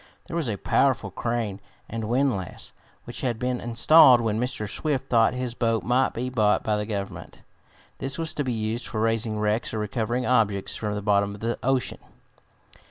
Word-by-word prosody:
There - - -7
was 160 -7 -1
a 105 - -2
powerful 120 -3 +1
crane 115 -2 -2 0.3
and 115 0 -4
windlass, 120 -7 -1 0.3
which - - -8
had 120 -3 -1
been 125 +1 -2
installed 125 +2 +6
when 110 -2 -1
Mr. 120 -3 -2
Swift 140 +5 -3
thought 115 +1 +4
his 125 -2 -3
boat 115 -2 0
might 125 +2 +1
be 125 +2 -2
bought 105 -5 +2
by 110 - +1
the 105 0 -3
Government. 100 -3 -6 0.6
This 135 +1 -1
was 165 -1 -2
to 145 - -2
be 130 - -2
used 110 +1 -3
for 110 - -4
raising 115 0 +1
wrecks 105 +2 -1
or - - -2
recovering 115 +4 -2
objects 105 -6 +1
from 105 -1 -3
the 105 - -4
bottom 100 -1 +1
of 100 - -14
the 115 +1 -2
ocean. 130 0 0
115 Hz, 185 wpm, -25 LUFS, 105-125 Hz, 0.6 s, installed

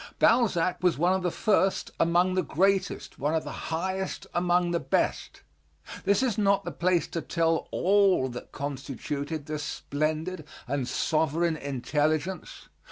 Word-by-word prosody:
Balzac 195 -7 +3
was 180 -4 +2
one 175 +4 +3
of 190 - 0
the 180 - 0
first 195 0 +1
among 175 +2 +3
the 185 - +2
greatest, 190 +5 0
one 150 +3 0
of 160 - 0
the - - -6
highest 190 +3 -2
among 175 0 +2
the 170 - +1
best. 135 -3 -1 0.6
This 200 +5 +3
is 230 -4 0
not 200 -1 +2
the - - -3
place 180 -1 +1
to 165 - -3
tell 165 0 0
all 195 -7 +3
that 125 0 -8
constituted 145 +2 -4
this 155 -1 -4
splendid 155 +4 -2 0.2
and 135 -1 -1
sovereign 160 +3 +1
intelligence. 150 +5 -2
170 Hz, 145 wpm, -27 LUFS, 150-185 Hz, 0.6 s, Balzac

